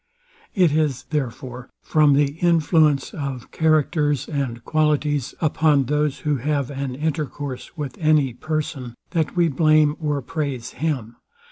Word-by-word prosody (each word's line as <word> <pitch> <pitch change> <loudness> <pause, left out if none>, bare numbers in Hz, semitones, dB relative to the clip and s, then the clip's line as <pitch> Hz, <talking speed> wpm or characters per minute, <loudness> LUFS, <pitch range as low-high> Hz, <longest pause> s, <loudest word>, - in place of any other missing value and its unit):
It 180 -6 +4
is 150 -4 0
therefore 130 -3 -4
from 150 -2 +4
the 140 0 +3
influence 160 -4 +3
of 135 -4 -5
characters 155 -3 +1
and 130 -6 -3
qualities, 150 -3 0
upon 150 -2 +3
those 150 +1 -1
who 150 -2 0
have 140 +1 -1
an 135 -2 -4
intercourse 145 -1 -4
with 140 -4 -5
any 150 -5 +3
person, 135 -3 -4 0.2
that 165 -2 -1
we 175 -1 +3
blame 155 0 +3
or 150 -3 -1
praise 135 -3 -4
him. 130 -7 -3
145 Hz, 130 wpm, -22 LUFS, 135-155 Hz, 0.2 s, It